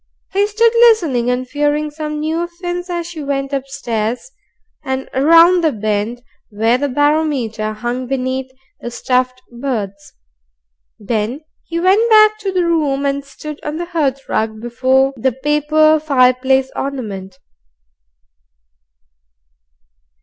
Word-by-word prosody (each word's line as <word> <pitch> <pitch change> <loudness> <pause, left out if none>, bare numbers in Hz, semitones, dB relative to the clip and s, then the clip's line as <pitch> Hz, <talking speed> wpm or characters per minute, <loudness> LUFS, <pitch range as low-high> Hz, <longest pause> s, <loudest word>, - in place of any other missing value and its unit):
He 400 +1 +2
stood 450 +2 +2
listening 335 - +4
and 250 +1 -1
fearing 295 +2 0
some 300 0 -5
new 320 +2 -1
offence 350 +1 -5
as 345 -1 -3
she 335 -2 -7
went 275 -1 -3
upstairs, 250 - -3 0.5
and 265 -1 -3
round 335 +5 +5
the 315 - +3
bend 215 +2 -2 0.3
where 225 +3 +1
the 285 +1 -1
barometer 275 -7 0
hung 240 +4 -4
beneath 260 0 -2 0.3
the 240 - -6
stuffed 255 +1 -1
birds. 220 -6 -5 0.8
Then 220 +5 -2 0.3
he 335 0 -2
went 395 +6 +3
back 430 -1 +6
to 400 -2 -3
the 365 -2 +1
room, 295 -5 0
and 280 0 -1
stood 300 +2 -9
on 300 +1 -4
the 345 - -3
hearthrug 270 -9 -2
before 260 +3 +1
the 255 +2 0
paper 300 +3 +2
fireplace 265 -2 +2
ornament. 200 -9 -5
275 Hz, 120 wpm, -17 LUFS, 245-315 Hz, 0.8 s, back